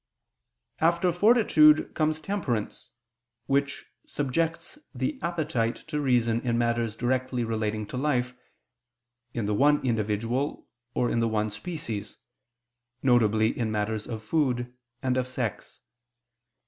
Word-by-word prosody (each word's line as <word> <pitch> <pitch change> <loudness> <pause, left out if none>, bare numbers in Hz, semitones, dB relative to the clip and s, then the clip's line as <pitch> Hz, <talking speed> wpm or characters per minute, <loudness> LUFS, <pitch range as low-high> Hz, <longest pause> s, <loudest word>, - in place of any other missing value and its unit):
After 170 +2 +3
fortitude 175 -6 +5
comes 155 0 0
temperance, 150 - -3 0.6
which 140 +1 0 0.2
subjects 165 - -2 0.2
the 290 -3 -2
appetite 155 -9 -1
to 150 -2 -1
reason 120 -4 +2
in 120 -2 0
matters 115 -2 0
directly 125 +1 -1
relating 110 -1 -2
to 125 - -6
life, 125 -3 0 1.0
in 115 -3 -1
the 105 - 0
one 145 +6 +4
individual, 115 +4 -1 0.3
or 120 - +1
in - - +1
the 115 - +2
one 110 -1 0
species, 115 - -5 0.9
viz. 110 -4 +4
in 110 -2 0
matters 110 0 -2
of 110 -2 -6
food 125 -3 0 0.3
and 130 -1 +1
of 130 0 0
sex. 125 -4 -5
125 Hz, 120 wpm, -27 LUFS, 115-150 Hz, 1.0 s, fortitude